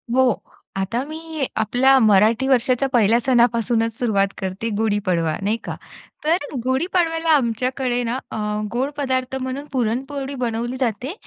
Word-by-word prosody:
हो, 260 -5 +3 0.3
आता 195 +6 -1
मी 315 -2 -4
आपल्या 250 +5 +4
मराठी 220 +4 +4
वर्षाच्या 255 +1 +2
पहिल्या 230 0 +4
सणापासूनच 235 -2 +2
सुरुवात 200 -5 +2
करते 190 +4 -3
गुढी 215 -2 +1
पाडवा, 165 -4 +1
नाही 210 +3 0
का? - - -5 0.5
तर 320 +3 +3 0.3
गुढी 260 +5 +1
पाडव्याला 330 -2 +1
आमच्याकडे 250 0 0
ना 235 +2 -1
अ, - - -4 0.3
गोड 255 +4 -1
पदार्थ 260 -2 -1
म्हणून 260 +2 -4
पुरणपोळी 270 +3 -2
बनवली 240 +2 -2
जाते. 250 - -2
245 Hz, 140 wpm, -21 LUFS, 225-270 Hz, 0.5 s, आपल्या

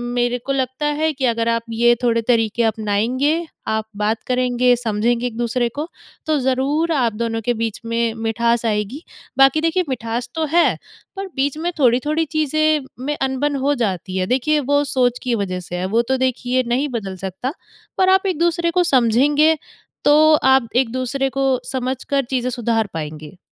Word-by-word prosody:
मेरे 245 0 +1
को 275 - -2
लगता 260 +2 -2
है 305 +2 +1
कि 270 -2 -2
अगर 230 -1 0
आप 230 0 +1
ये 240 +1 +3
थोड़े 230 -1 +2
तरीके 225 -1 +1
अपनाएँगे, 230 +9 0 0.2
आप 220 0 -1
बात 215 +2 0
करेंगे, 250 -1 +2
समझेंगे 235 +1 0
एक-दूसरे 240 +1 -1
को, 295 +7 -5 0.4
तो 310 -2 +1
ज़रूर 275 +6 0
आप 240 -6 +1
दोनों 225 +1 -2
के 245 - +2
बीच 225 -2 -3
में 230 0 0
मिठास 235 +1 0
आएगी। 215 - -2 0.3
बाकी 270 +3 +5
देखिए 330 +3 +1
मिठास 240 -1 -3
तो 320 -1 0
है, 345 +1 +4 0.4
पर 390 0 -5
बीच 280 +2 0
में 345 +2 -2
थोड़ी-थोड़ी 290 +6 +2
चीज़ें 310 -1 +1 0.2
में 295 - -1
अनबन 270 +2 -1
हो 290 - +3
जाती 190 - -2
है। 185 - 0
देखिए 295 +6 +1
वो 285 +1 +1
सोच 245 -2 +2
की 245 -2 0
वज़ह 185 -3 -2
से 180 0 -7
है, 180 +1 -2
वो 225 +5 +2
तो 260 +2 -1
देखिए 255 0 0
नहीं 260 +5 0
बदल 205 -7 -4
सकता। 195 - -4 0.4
पर 375 0 +3
आप 380 +1 +4
एक-दूसरे 340 -1 +1
को 360 +1 +2
समझेंगे 285 +3 +3 0.5
तो 310 +1 +6
आप 265 -3 +4
एक-दूसरे 255 +2 0
को 270 -1 0
समझ 260 0 -3
कर 280 -1 0
चीज़ें 255 -1 0
सुधार 230 -3 0
पाऍंगे। 155 +2 -7
250 Hz, 175 wpm, -20 LUFS, 230-290 Hz, 0.5 s, तो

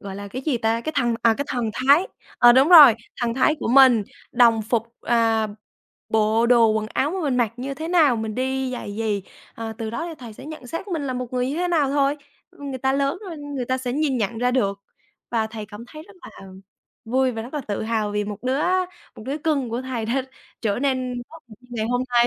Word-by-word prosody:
gọi 195 -1 -7
là 200 0 -7
cái 255 +6 -6
gì 265 -6 0
ta, 225 +1 0
cái 315 +5 -4
thần, 240 -3 +2
à, 230 -1 +4
cái 285 - -2
thần 240 -4 -2
thái. 280 +8 +4 0.3
Ờ, 240 0 +8
đúng 265 +5 +5
rồi, 295 -10 +10 0.3
thần 235 -1 0
thái 265 +4 +3
của - - -2
mình, 255 -4 +6 0.3
đồng 230 -3 +4
phục 230 +1 -2
à, 225 -2 +2 0.6
bộ 220 +1 +2
đồ 235 -2 +5
quần 215 0 -1
áo 290 - +1
mà 380 +1 -3
mình 275 -5 0
mặc 235 -4 +1
như 270 +2 -5
thế 320 +3 -6
nào? 310 -9 +4
Mình 220 -1 -4
đi 265 0 -1
giày 205 -5 -6
gì? 215 -3 -1 0.3
À, 225 -1 -5
từ 220 -1 -4
đó 330 +9 -4
thì 330 - -7
thầy 235 -4 -9
sẽ 260 - -12
nhận 310 -5 -9
xét 330 - -6
mình 325 -5 -2
là 260 - -2
một 250 0 -5
người 250 0 0
như 295 - -3
thế 355 0 0
nào 300 -6 +2
thôi. 280 0 +1 0.3
Ưm, 285 -1 -9
người 260 - -5
ta 265 +1 +1
lớn 275 +5 0
rồi, 335 - -7
người 285 -3 -5
ta 260 +2 -1
sẽ 250 -1 -3
nhìn 285 -2 0
nhận 225 +1 -2
ra 245 +1 +1
được 200 -6 0 0.5
và 225 -2 0
thầy 220 -1 -8
cảm 215 +2 -10
thấy 310 0 -10
rất 365 - -18
là 195 - -12 0.6
vui 255 +3 +1
và 225 - -5
rất 250 +6 -10
là 295 - -1
tự 210 -5 -4
hào 220 -2 -1
vì 210 0 -1
một 205 0 -6
đứa 260 +3 0 0.5
một - - -10
đứa 285 +3 -3
cưng 285 -5 0
của 240 +3 -3
thầy 250 -4 -4
đã 260 +3 0 0.4
trở 210 -2 -1
nên 255 -2 -1
tốt 325 +1 -12
được 215 - -13
như 250 - -22
ngày 220 -2 -2
hôm 245 +1 +1
nay. 240 0 +4
250 Hz, 250 wpm, -23 LUFS, 225-275 Hz, 0.6 s, rồi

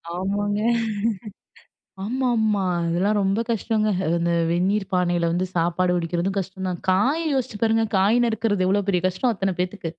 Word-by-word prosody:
ஆமாங்க. 205 +2 -1 1.4
ஆமா, 255 +5 -1
ஆமா. 210 -3 +1 0.2
அதெல்லா 175 +5 +1
ரொம்ப 195 +2 +1
கஷ்டங்க. 220 -1 0 0.3
அந்த 170 0 0 0.2
வெந்நீர் 195 +4 +1
பானையில 175 -2 +1
வந்து 180 +2 0
சாப்பாடு 175 +1 +1
வடிக்கிறதும் 175 +3 -1
கஷ்டம் 190 0 -5
தான். 175 -2 -4
காய 250 - +2
யோசிச்சு 255 -5 -2
பாருங்க, 225 0 +3
காய் 205 +5 +3
நறுக்கிறது, 220 -4 0
எவ்வளோ 200 +2 +2
பெரிய 180 -2 +1
கஷ்டம் 230 +7 0
அத்தன 195 -2 -2
பேத்துக்கு. 180 -2 -4
195 Hz, 145 wpm, -23 LUFS, 180-215 Hz, 1.4 s, பாருங்க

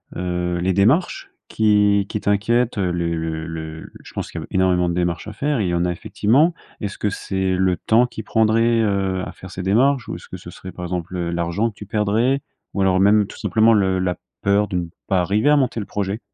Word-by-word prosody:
heu, 90 0 -2
les 95 +2 +1
démarches 120 - +1 0.2
qui 105 -2 +3
qui 105 - -3
t'inquiètent? 115 +4 +1
Heu 90 -3 0
les 85 -1 -1
le 80 0 -3
le 80 -1 -6
le - - -12
je - - -13
pense - - -4
qu'il - - -5
y - - -6
a - - -7
b - - -24
énormément 90 -1 +2
de 85 - -1
démarches 90 +2 -1
à 105 - -6
faire 145 +2 -1
et - - 0
il - - 0
y - - -1
en 85 0 +1
a 90 - 0
effectivement. 130 - +2 0.3
Est-ce 100 -2 -5
que 105 - 0
c'est 95 -1 -2
le 95 -1 +2
temps 115 +8 +3
qui 115 -2 -7
prendrait, 115 +2 +2
heu, 95 -3 0
à - - -7
faire 95 - -12
ces 95 0 -6
démarches? 125 +6 +2
Ou - - -3
est-ce - - -14
que - - -7
ce - - -11
serait, 95 - -9
par 90 - -7
exemple, 90 0 -4
heu, 85 -1 -2
l'argent 85 +6 0
que - - -27
tu 105 -1 -10
perdrais? 110 +6 +1 0.3
Ou 100 - 0
alors, 95 -1 +3
même, 105 +1 +5
tout - - -12
simplement, 110 +1 +3
le 95 -3 +2
la 90 -2 0 0.3
peur 100 +1 +3
de 95 - -5
ne 85 - -1 0.2
pas 95 -2 +2
arriver 105 +10 +2
à 150 - +6
monter 130 -4 0
le 105 - -5
projet? 100 +1 -3
100 Hz, 250 wpm, -21 LUFS, 90-110 Hz, 0.3 s, à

